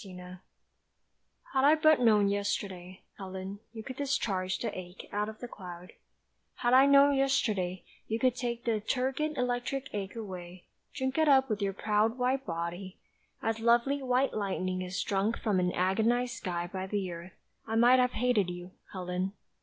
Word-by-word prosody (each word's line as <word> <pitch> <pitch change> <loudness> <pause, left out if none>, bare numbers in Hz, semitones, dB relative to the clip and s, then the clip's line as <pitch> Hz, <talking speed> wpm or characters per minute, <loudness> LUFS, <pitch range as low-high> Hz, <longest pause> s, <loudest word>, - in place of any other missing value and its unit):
REPROACH 180 -1 -10 1.1
HAD 265 -1 +2
I 295 +3 +7
but 310 -1 +5
known 215 -4 +4
yesterday, 195 -2 -3 0.2
Helen, 190 +1 -6
you 220 -1 -8
could 260 +2 -7
discharge 200 -10 -1
the 235 - -4
ache 180 0 -9
Out 210 +1 -1
of 220 - -9
the 245 - -5
cloud; 180 -5 -10 0.6
Had 240 0 +1
I 265 +2 +7
known 280 0 +6
yesterday 215 -10 0 0.2
you 220 - -1
could 255 0 +2
take 240 -1 -3
The 225 -2 +1
turgid 270 +6 -1
electric 250 +2 -2
ache 200 0 -4
away, 185 -5 -8 0.3
Drink 265 +2 -2
it 315 - +4
up 265 -3 +5
with 210 -1 -1
your 195 -1 0
proud 215 +3 +1
White 260 +1 0
body, 170 +3 -4 0.5
as 225 0 0
lovely 240 +5 +3
white 260 +1 +1
lightning 185 -3 -2
Is 185 +1 -4
drunk 205 +3 0
from 205 -5 0
an 180 0 +1
agonised 230 +8 +1
sky 175 -5 -3
by 190 +1 -5
the 195 -2 -2
earth, 170 +2 -9 0.3
I 220 - -2
might 245 +3 +6
have 250 0 +2
hated 240 -7 +2
you, 175 +1 -7 0.2
Helen. 185 0 -3
215 Hz, 170 wpm, -30 LUFS, 185-250 Hz, 1.1 s, I